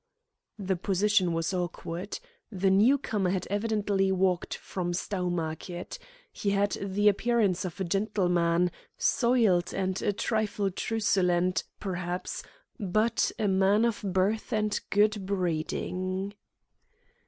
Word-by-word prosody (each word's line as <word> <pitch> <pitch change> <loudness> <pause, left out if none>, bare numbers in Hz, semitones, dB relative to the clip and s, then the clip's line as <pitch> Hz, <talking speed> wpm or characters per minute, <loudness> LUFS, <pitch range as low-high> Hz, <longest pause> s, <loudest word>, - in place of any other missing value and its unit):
The 190 -3 -1
position 195 0 +2
was 165 +3 -1
awkward. 175 +1 -4 0.3
The 190 -1 +1
new 220 +9 +5
comer 210 -8 -1
had 185 0 -1
evidently 205 -2 +1
walked 185 -1 +1
from 175 -2 -4
Stowmarket. 175 -2 -3 0.3
He 205 - -2
had 200 0 +2
the 200 +1 +1
appearance 205 -3 +2
of 180 0 -6
a - - 0
gentleman, 180 -3 +1 0.3
soiled 225 -8 +2
and 190 -1 -1
a 205 - +1
trifle 205 -1 -1
truculent, 185 -4 +1
perhaps, 180 -2 -3 0.4
but 215 +3 +1
a 215 -3 0
man 195 +3 +3
of 235 -3 -1
birth 195 +4 0
and 215 -2 0
good 205 -1 +2
breeding. 185 +1 -2
195 Hz, 115 wpm, -28 LUFS, 180-210 Hz, 0.4 s, new